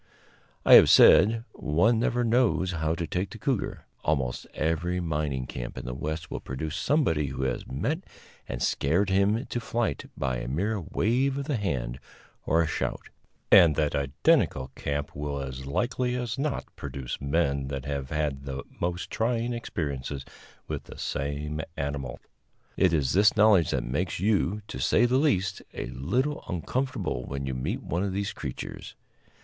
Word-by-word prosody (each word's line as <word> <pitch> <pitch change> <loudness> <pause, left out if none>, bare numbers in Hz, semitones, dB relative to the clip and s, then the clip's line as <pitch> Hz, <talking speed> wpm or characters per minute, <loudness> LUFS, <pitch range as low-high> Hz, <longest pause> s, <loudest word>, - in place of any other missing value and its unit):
I - - +7
have - - +10
said, 115 +2 +7
one 100 +10 +2
never 120 +1 +1
knows 110 -7 +2
how 80 -1 -1
to 85 - -2
take 90 +4 -2
the 110 - -9
cougar. 115 0 -2 0.2
Almost 65 -5 -1
every 85 +3 0
mining 75 -6 -1
camp - - -6
in - - -6
the 60 - -4
West 80 +4 -4
will - - -3
produce 75 +4 -5
somebody 80 - +1
who 65 0 -4
has 65 -2 -2
met 140 - -1 0.5
and - - -3
scared 90 +8 +1
him 100 +6 +2
to 120 - -3
flight 115 -8 -2
by 65 -2 -1
a - - -5
mere 100 - -1
wave 125 - +1
of 140 - -3
the 145 -2 -1
hand 65 - -2 0.5
or 85 +1 +4
a - - -1
shout, - - -3 0.4
and 85 -6 +8
that 75 0 +1
identical 65 -1 +2
camp 70 +1 -3
will 70 0 -3
as 65 -1 -6
like 120 - -1
as 125 -1 -1
not 145 -1 -1
produce 65 -3 -6
men 70 -2 0
that 70 -1 -4
have 70 -2 -3
had 75 -4 -2
the 70 0 -4 0.2
most 85 +1 -2
trying 120 +1 0
experiences 70 - -4 0.4
with - - -4
the - - -11
same 75 +2 -3 0.2
animal. 70 -3 -3 0.6
It 95 -3 +3
is 70 -6 +1
this 105 +2 +5
knowledge 105 -6 +5
that - - 0
makes 80 +9 -2
you, 105 0 +1
to 65 - -6
say 115 - +4
the 125 +2 +3
least, 95 -10 +1
a - - -3
little 125 - -1
uncomfortable 90 - -2
when 70 0 -4
you 65 - -2
meet 85 - -3
one 85 - -1
of 100 -2 -2
these 100 +1 -2
creatures. 65 -5 -7
80 Hz, 165 wpm, -27 LUFS, 70-110 Hz, 0.6 s, have